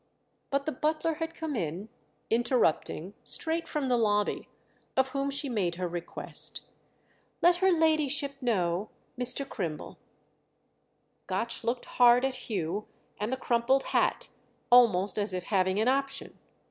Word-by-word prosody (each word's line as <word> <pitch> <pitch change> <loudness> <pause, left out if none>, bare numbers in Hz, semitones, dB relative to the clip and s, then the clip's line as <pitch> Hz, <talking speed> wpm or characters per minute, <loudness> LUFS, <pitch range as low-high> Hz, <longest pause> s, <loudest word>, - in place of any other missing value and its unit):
But 275 0 -1
the 310 - -1
butler 310 +4 -1
had 325 0 -3
come 315 -3 -4
in, 180 +1 -3 0.4
interrupting, 225 - +1
straight 330 +1 +2
from 295 -4 -2
the 250 -1 +2
lobby; 210 -2 0 0.5
of 265 0 +3
whom 275 +1 -2
she 280 +1 -1
made 195 -9 -1
her 180 +1 -3
request. 175 0 -3 0.8
"Let 350 +1 +5
her 380 +1 +3
ladyship 305 -4 +2
know—Mr. 230 +5 0
Crimble." 170 - -5 1.3
Gotch - - -2
looked 240 +1 -2
hard 245 +1 +5
at 260 -1 -4
Hugh 195 0 -2 0.3
and 210 +3 -2
the 260 - -1
crumpled 255 +2 +1
hat—almost 210 -5 +2
as 205 -2 0
if 180 - -3
having 190 0 +1
an 220 - +1
option. 275 +1 -1
245 Hz, 130 wpm, -29 LUFS, 200-275 Hz, 1.3 s, Let